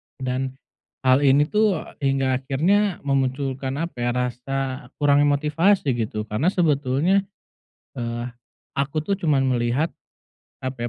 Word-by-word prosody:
Dan 130 0 -3 0.5
hal 130 0 +5
ini 140 0 +5
tuh 210 -5 +2 0.2
hingga 135 -2 +1
akhirnya 175 +9 +1
memunculkan 135 -1 -1
apa, 165 +1 -4
ya, 120 0 +1
rasa 130 +2 -3
kurangnya 145 0 +4
motivasi 150 +4 +2
gitu, 110 -1 -2
karena 110 +8 -1
sebetulnya, 165 +2 +2 0.7
eee, 120 0 -3 0.5
aku 140 +2 -1
tuh 200 +4 0
cuman 135 -5 +2
melihat 120 +6 +1 0.8
apa, 130 -2 -3
135 Hz, 115 wpm, -23 LUFS, 130-150 Hz, 0.8 s, hal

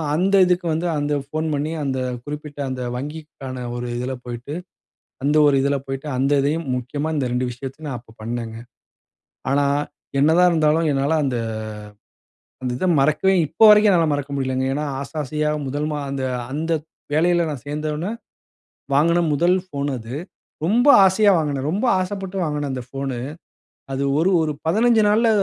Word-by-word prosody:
அந்த 190 +4 +2
இதுக்கு 180 0 +1
வந்து 165 +3 -1
அந்த 145 0 -1
ஃபோன் 155 +3 -3
பண்ணி, 145 +2 -2
அந்த 135 -2 -1 0.3
குறிப்பிட்ட 150 0 -7
அந்த 130 -1 -4
வங்கிக்கான 135 -2 -6
ஒரு 120 0 -4
இதுல 125 +2 -3
போய்ட்டு, 120 +3 -6 0.7
அந்த 145 +2 +2
ஒரு 145 - +4
இதுல 140 +1 +1
போய்ட்டு, 135 +2 -5
அந்த 135 +2 +1
இதையும், 150 +4 0
முக்கியமா 145 +5 -3
இந்த 140 -3 0
2 125 +1 0
விஷயத்தையும் 135 +5 -8
நான் 130 - -3
அப்போ 115 -1 -20
பண்ணேங்க. 115 0 -4 0.9
ஆனா, 140 +1 +3 0.5
என்னாதான் 160 +5 +5
இருந்தாலும் 160 0 +2
என்னால 140 +3 +1
அந்த 125 -3 -1 1.2
அந்த 125 -1 -1
இத 185 - 0
மறக்கவே 155 +7 +3
இப்ப 160 +8 -3
வரைக்கும் 210 0 +7
என்னால 170 -4 +4
மறக்க 145 0 -3
முடியலங்க. 130 -1 -1
ஏனா 145 +2 -1 0.2
ஆசை 140 +1 -7
ஆசையா 150 +2 -1 0.2
முதல் 145 +3 -2
மா 150 - -2
அந்த 135 -1 -2 0.3
அந்த 160 +3 -1 0.4
வேலையில 170 +2 +3
நான் 145 -5 -5
சேந்தவொன்னே, 150 +4 -3 0.8
வாங்குன 170 +5 +4
முதல் 175 +5 +3
ஃபோன் 145 -5 -3
அது. 115 +1 -7 0.5
ரொம்ப 235 - +3 0.2
ஆசையா 200 +2 +4
வாங்குனேன். 145 -3 -1
ரொம்ப 200 +8 -1 0.2
ஆசைப்பட்டு 195 0 -4
வாங்குன 150 -2 -2
அந்த 130 -1 -4
ஃபோனு. 135 -1 -4 0.8
அது 135 +1 -1 0.2
ஒரு 180 +4 +3
ஒரு 155 -1 0
15 225 +5 +4
நாள்ல 225 +2 +4
150 Hz, 155 wpm, -22 LUFS, 135-165 Hz, 1.2 s, வரைக்கும்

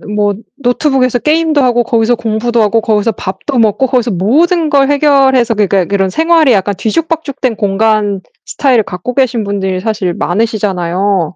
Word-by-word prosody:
뭐 205 -1 +1 0.3
노트북에서 255 -1 0
게임도 310 +1 +1
하고 245 -1 +2
거기서 230 0 +1
공부도 230 +1 -1
하고 215 +2 +2
거기서 220 0 0
밥도 200 +7 -4
먹고 225 +4 +2
거기서 245 -3 0
모든 310 - +1
걸 275 -2 +3
해결해서 270 -4 +3
그러니까 200 -3 +1
그런 195 +1 -1
생활이 320 - +3
약간 200 0 0
뒤죽박죽된 280 - -2
공간 205 -1 0 0.2
스타일을 250 -6 +1
갖고 180 +8 -6
계신 245 -4 0
분들이 190 -2 -3
사실 210 -5 -2
많으시잖아요. 190 -3 -1
230 Hz, 385 characters per minute, -12 LUFS, 200-265 Hz, 0.3 s, 걸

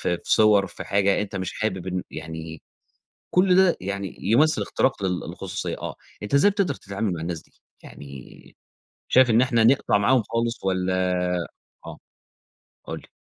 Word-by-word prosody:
في 85 -1 0
صور 105 -2 +4
في - - -7
حاجة 100 0 +2
أنت 105 -1 -6
مش 95 0 -3
حابب 95 -4 -2
إن 90 -1 -2
يعني 80 -1 -8 0.7
كل 180 0 +4
ده 190 -2 +4
يعني 100 +1 -5
يمثل 140 +11 +3
اختراق 130 -6 0
للخصوصية، 90 -2 -4
آه. - - -6 0.3
أنت 105 - -4
إزاي 170 +9 +5
بتقدر 195 -8 0
تتعامل 100 -1 -4
مع 80 - -5
الناس 85 -1 -4
دي؟ - - -27 0.3
يعني 70 -3 -13 0.5
شايف 130 -1 +5
إن 115 +1 +4
إحنا 120 -3 +2
نقطع 120 -2 +3
معاهم 120 +3 +3
خالص 115 +2 -2
والّا 95 -1 0 0.9
آه - - -8 0.9
قُل - - -5
لي. - - -18
100 Hz, 155 wpm, -24 LUFS, 90-125 Hz, 0.9 s, إزاي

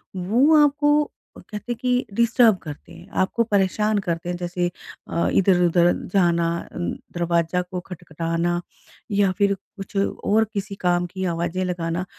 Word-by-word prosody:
वो 250 - +4
आपको 295 +1 +3 0.3
कहते 210 +3 -7
हैं - - -1
कि 250 0 +1
डिस्टर्ब 235 -1 +4
करते 150 -3 -9
हैं, - - -13
आपको 190 +5 +2
परेशान 210 0 +1
करते 170 0 -2
हैं, 175 - -1
जैसे 175 0 -2 0.4
अ, 170 - 0
इधर-उधर 175 -2 +4 0.2
जाना 170 -3 +3 0.2
अ, - - -10
दरवाज़ा 175 0 -1
को 180 0 -5
खटखटाना 170 0 -2 0.5
या 200 -2 +3
फिर 200 -1 +3 0.2
कुछ 195 +1 -9
और 205 +2 +1
किसी 200 -1 -4
काम 175 -1 +2
की 190 +2 -5
आवाज़ें 170 +1 -1
लगाना। 175 0 -2
185 Hz, 145 wpm, -23 LUFS, 175-210 Hz, 0.5 s, वो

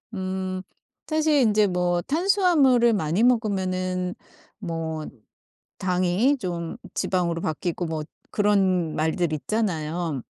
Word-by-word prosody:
음. 185 0 -3 0.4
사실 310 -5 +3
이제 210 -1 +3
뭐 180 -1 0
탄수화물을 305 - +3
많이 175 +1 0
먹으면은 185 -6 +1 0.4
뭐 165 -5 -4 0.7
당이 185 +9 +2
좀 170 -4 -4 0.2
지방으로 170 -2 0
바뀌고 170 +2 -2
뭐 160 -1 -3 0.3
그런 190 -5 +2
말들 160 +1 0
있잖아요. 165 - -2
185 Hz, 215 characters per minute, -24 LUFS, 170-215 Hz, 0.7 s, 사실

